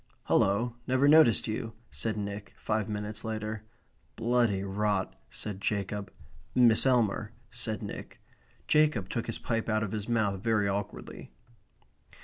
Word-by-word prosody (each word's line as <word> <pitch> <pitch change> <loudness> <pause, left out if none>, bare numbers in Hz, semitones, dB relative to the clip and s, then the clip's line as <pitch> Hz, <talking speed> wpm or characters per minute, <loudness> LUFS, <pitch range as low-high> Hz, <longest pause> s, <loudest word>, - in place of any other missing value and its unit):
"Hullo, 115 +5 +2
never 130 +2 +3
noticed 150 -6 +6
you," 110 +1 -3 0.2
said 110 -2 -2
Nick, 100 0 -5
five 110 0 -1
minutes 105 +1 -3
later. 110 -1 -3 0.5
"Bloody 120 -5 +2
rot," 100 0 0 0.2
said 100 -2 -5
Jacob. 100 -1 -2 0.4
"Miss 120 0 +5
Elmer," 110 -3 +2 0.2
said 110 -2 -2
Nick. 100 - -7 0.5
Jacob 150 -11 +3
took 115 - -2
his 115 - -2
pipe 115 -1 -2
out 110 0 +2
of 100 - -3
his 105 0 -4
mouth 105 -5 +1
very 110 -2 +2
awkwardly. 100 0 -4
110 Hz, 130 wpm, -30 LUFS, 100-115 Hz, 0.5 s, noticed